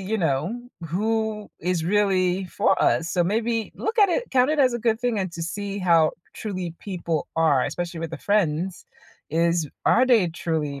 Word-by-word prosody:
you 200 +4 -2
know, 175 - -1 0.2
who 215 +4 -1
is 175 -1 -1
really 190 -1 +2
for - - +1
us, 165 +1 +2
so 175 - +2
maybe 225 +4 -1
look 445 +3 -3
at 410 -2 +6
it 475 +7 -1
count 255 +1 +3
it 310 - 0
as 260 -3 +4
a 240 - -2
good 225 -1 +1
thing 240 -2 0
and 190 -2 -2
to 170 - -5
see 200 +4 -4
how 170 -4 +4 0.2
truly 185 -6 -5
people 170 -5 -3
are 150 -5 +3
especially 175 -1 -4
with 165 -1 -4
the 165 - -5
friends 185 -3 0 0.4
is, 170 0 +1 0.2
are 255 +3 +4
they 230 -7 +4
truly 160 -4 -3
185 Hz, 185 wpm, -24 LUFS, 165-220 Hz, 0.4 s, at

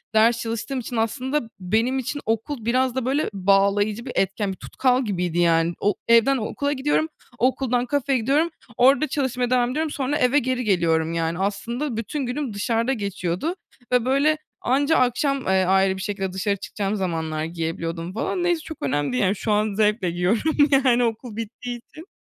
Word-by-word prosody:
ders 230 +2 +4
çalıştığım 230 +4 -3
için 245 0 -6
aslında 245 +3 -1
benim 225 +8 +1
için 275 +3 -3
okul 225 +2 -2
biraz 255 +1 +1
da, 260 -2 -1
böyle, 280 +4 0
bağlayıcı 200 +3 +2
bir 255 - -5
etken, 195 +1 0
bir 190 - -7
tutkal 255 -1 0
gibiydi 180 -4 -1
yani. 165 0 +3
O 205 0 +1
evden 235 +4 +5
okula 285 +6 -2
gidiyorum, 295 +3 +1 0.3
okuldan 250 0 +1
kafeye 275 0 0
gidiyorum, 285 +8 +2 0.3
orada 275 +5 +5
çalışmaya 250 -4 -1
devam 250 -1 +2
ediyorum 310 +2 -1
sonra 280 +1 -1
eve 270 0 +3
geri 255 -1 -1
geliyorum, 165 -5 +1
yani, 165 +1 -1
aslında 230 +7 -2
bütün 265 +5 -3
günüm 250 -1 -3
dışarıda 230 +5 0
geçiyordu 200 - -2 0.4
ve 250 -2 +3
böyle 280 +4 +3 0.2
anca 285 +5 +2
akşam, 265 +3 +1
eee, 190 -1 +3
ayrı 190 0 +3
bir - - -6
şekilde 195 -2 -3
dışarı 200 +2 0
çıkacağım 200 +1 -3
zamanlar 160 -5 -2
giyebiliyordum 165 +1 -4
falan 350 - -2
neyse 345 -2 +1
çok 320 0 -8
önemli 145 0 0
değil, 125 0 +1
yani, 195 +2 +2
şu 215 - -2
an 210 0 +1
zevkle 210 -3 +1
giyiyorum, 190 - +1 0.3
yani, 245 -1 +4
okul 230 -1 -3
bittiği 240 +2 -5
için. 310 +8 -14
230 Hz, 175 wpm, -23 LUFS, 195-260 Hz, 0.4 s, evden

